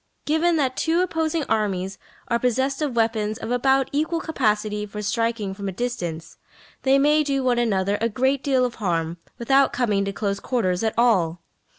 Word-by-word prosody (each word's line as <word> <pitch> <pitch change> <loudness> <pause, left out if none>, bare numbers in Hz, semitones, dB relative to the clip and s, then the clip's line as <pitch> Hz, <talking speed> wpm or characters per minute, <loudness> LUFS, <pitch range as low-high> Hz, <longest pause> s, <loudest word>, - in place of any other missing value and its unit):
Given 325 +3 +2
that 265 -4 0
two 335 +2 +2
opposing 325 -3 0
armies 195 -3 -1 0.3
are 235 - +1
possessed 265 +4 0
of 285 -5 -1
weapons 220 -2 0
of 225 - -6
about 265 +2 +2
equal 315 +3 0
capacity 215 -9 -1
for 210 +1 -6
striking 225 -2 -1
from 200 0 -5
a - - -3
distance, 175 -8 -4 0.4
they 270 0 +4
may 300 +2 +4
do 275 -2 -1
one 245 -2 +2
another 205 -3 +1
a 230 - +2
great 260 +4 0
deal 260 -3 +2
of 245 - -3
harm 170 -3 -1 0.2
without 270 +3 +3
coming 220 -5 +1
to 200 - -2
close 200 -1 -2
quarters 185 -8 -1
at 220 - 0
all. 180 -8 +2
235 Hz, 180 wpm, -23 LUFS, 205-270 Hz, 0.4 s, they